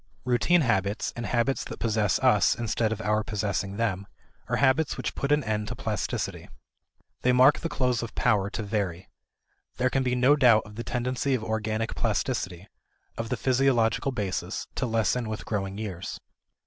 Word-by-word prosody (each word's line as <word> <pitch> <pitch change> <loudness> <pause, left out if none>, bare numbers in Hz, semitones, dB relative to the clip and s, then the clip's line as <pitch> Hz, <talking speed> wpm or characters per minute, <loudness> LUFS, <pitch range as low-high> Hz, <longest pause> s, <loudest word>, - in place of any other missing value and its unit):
Routine 125 +8 +3
habits, 105 -5 0
and 120 - -4
habits 120 +1 0
that - - -7
possess 110 -3 +1
us - - +4
instead 115 -1 -1
of 110 -1 -3
our 105 0 +1
possessing 100 -2 -2
them, 100 -4 -1 0.4
are - - 0
habits 140 +2 +2
which - - -3
put 140 - -2
an 150 -1 +3
end 105 -1 -2
to - - -4
plasticity. - - -3 0.7
They 125 - +3
mark 130 +3 +6
the 165 - -3
close 125 -5 0
of 115 - -7
power 100 -1 +2
to 110 - -4
vary. 100 -4 -3 0.7
There 125 0 +1
can 135 - +1
be 125 -1 0
no 125 +4 +5
doubt 120 -6 +5
of 105 - -12
the 115 +3 -5
tendency 125 +3 -1
of 115 - -3
organic 110 0 -2
plasticity, 90 +2 -2 0.5
of 115 0 -4
the 125 - -1
physiological 130 -1 +2
basis, 100 -7 -3
to 125 - -2
lessen 115 +1 0
with 110 - -5
growing 100 -2 -3
years. 100 -4 -5
115 Hz, 175 wpm, -27 LUFS, 105-125 Hz, 0.7 s, mark